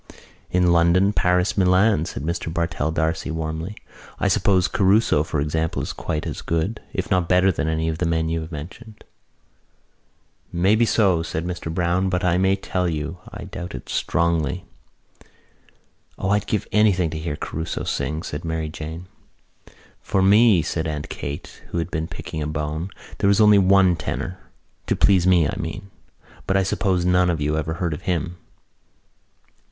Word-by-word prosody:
"In 90 -1 +3
London, 85 +4 +4
Paris, 90 0 +2
Milan," 95 -2 +3
said 70 - -6
Mr 85 0 -3
Bartell 85 -2 -1
D'Arcy 80 0 -1
warmly. 80 +4 -4 0.4
"I - - +2
suppose 95 -3 +3
Caruso, 100 -3 +3
for 80 -1 -2
example, 80 +2 -1
is - - -4
quite 75 - -3
as - - -5
good, 85 +7 -2
if - - -4
not 90 -2 +2
better 90 +1 +4
than 80 - -2
any 80 0 0
of 80 0 -2
the 90 - +1
men 80 -1 0
you 80 0 -1
have 80 +2 -8
mentioned." 105 +9 -9 1.5
"Maybe 105 +7 +3
so," 95 -8 +3
said 80 0 -4
Mr 90 -2 -4
Browne. 90 +3 +1
"But 90 0 -1
I 90 0 +2
may 95 +1 +3
tell 90 -2 -2
you 80 +2 -4
I - - -8
doubt 90 -4 -7
it 65 - -9
strongly." 85 0 0 1.5
"O, 95 - -2
I'd 105 0 +1
give 105 - -1
anything 95 -6 +3
to 80 - -4
hear 80 -2 -3
Caruso 80 +2 -4
sing," 75 +4 -2
said 75 - -5
Mary 80 -1 -2
Jane. 80 +2 -7 1.0
"For 95 - 0
me," 105 -2 +5
said 80 +1 -2
Aunt 75 -2 -4
Kate, 70 +1 -7
who - - -4
had 85 +1 -2
been 80 -1 -2
picking 80 - -6
a 75 - -2
bone, 75 +3 -3 0.3
"there - - +2
was 100 +1 +4
only 105 -1 +7
one 95 -1 +5
tenor. 80 +4 -4 0.5
To - - +1
please 95 -3 +4
me, 85 -5 +5
I - - -3
mean. 100 - -6 0.6
But 95 - +2
I 95 - +3
suppose 95 -2 0
none 90 0 +3
of 85 -3 0
you 75 +1 0
ever 80 +1 -2
heard 85 -2 -2
of 75 - -6
him." 85 0 -1
85 Hz, 170 wpm, -22 LUFS, 80-95 Hz, 1.5 s, only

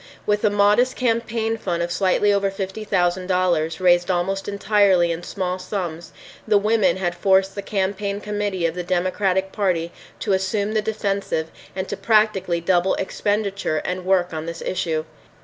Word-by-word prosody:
With 210 0 +1
a 210 - +4
modest 205 +5 +3
campaign 230 -2 0
fund 175 -5 -2
of 170 - -3
slightly 195 +3 +2
over 200 0 +1
fifty 195 +2 -5
thousand 180 -2 0
dollars, 175 -4 +1
raised 175 -1 +3
almost 190 +2 -1
entirely 200 -4 +3
in 165 +1 -3
small 185 0 -3
sums, 180 -3 -5 0.4
the 215 -1 +5
women 205 -3 +2
had 175 -2 -1
forced 190 +1 +2
the 200 - -5
campaign 200 0 -2
committee 205 -4 -2
of 165 - 0
the 180 - -4
Democratic 185 +2 0
Party 175 -5 0 0.3
to 205 - 0
assume 200 +2 0
the 215 - +2
defensive 200 -6 -2 0.2
and 190 0 -3
to - - -3
practically 200 -4 +2
double 175 +2 +2
expenditure 200 -3 -1
and 180 0 -3
work 180 -2 +1
on 160 0 -4
this 170 0 -6
issue. 165 -4 -1
190 Hz, 165 wpm, -22 LUFS, 175-205 Hz, 0.4 s, the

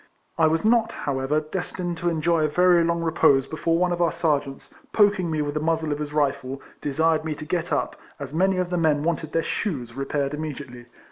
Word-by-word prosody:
I 160 - +4
was 160 +4 0
not, 225 0 +3
however, 140 +2 0
destined 175 +2 -4
to 175 +1 0
enjoy 165 0 +1
a - - +3
very 175 +2 +4
long 170 0 0
re 165 - 0
pose 135 -4 +4
before 165 +2 -1
one 180 +1 +1
of 175 0 -1
our 170 - +3
Serjeants, 145 -5 -2 0.2
poking 205 -4 +3
me 155 -2 0
with 145 0 -3
the 150 - -1
muzzle 160 0 0
of 145 - -2
his 150 -1 -4
rifle, 140 -3 -1 0.2
desired 160 +2 +1
me 155 -1 -3
to 155 - -8
get 170 +2 -2
up, - - -1 0.2
as 140 0 -7
many 190 +3 +2
of 180 -1 -1
the 180 - 0
men 150 -3 +2
wanted 160 -1 -2
their 165 - 0
shoes 130 - -3
repaired 140 +2 -2
immediately. 140 -5 -6
160 Hz, 215 wpm, -24 LUFS, 145-170 Hz, 0.2 s, I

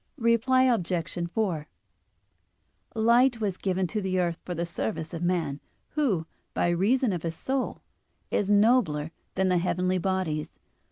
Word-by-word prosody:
Reply 240 +2 +3
Obj. 175 -7 0
4: 175 -9 -1 1.3
Light 235 +2 +4
was 200 -4 -1
given 190 -1 0
to 210 +4 -2
the 185 -1 0
earth 170 -1 0
for 180 - -4
the 170 +1 -1
service 170 -1 -4
of 165 - -4
man, 170 -5 0 0.3
who, 235 - 0 0.3
by - - +2
reason 210 +6 +2
of 175 - -3
his 165 0 -3
soul, 265 +8 -2 0.5
is 205 - +1
nobler 205 -8 +3 0.2
than 190 0 +2
the 180 -1 +3
heavenly 180 +1 0
bodies. 180 -5 -1
185 Hz, 145 wpm, -27 LUFS, 170-225 Hz, 1.3 s, Light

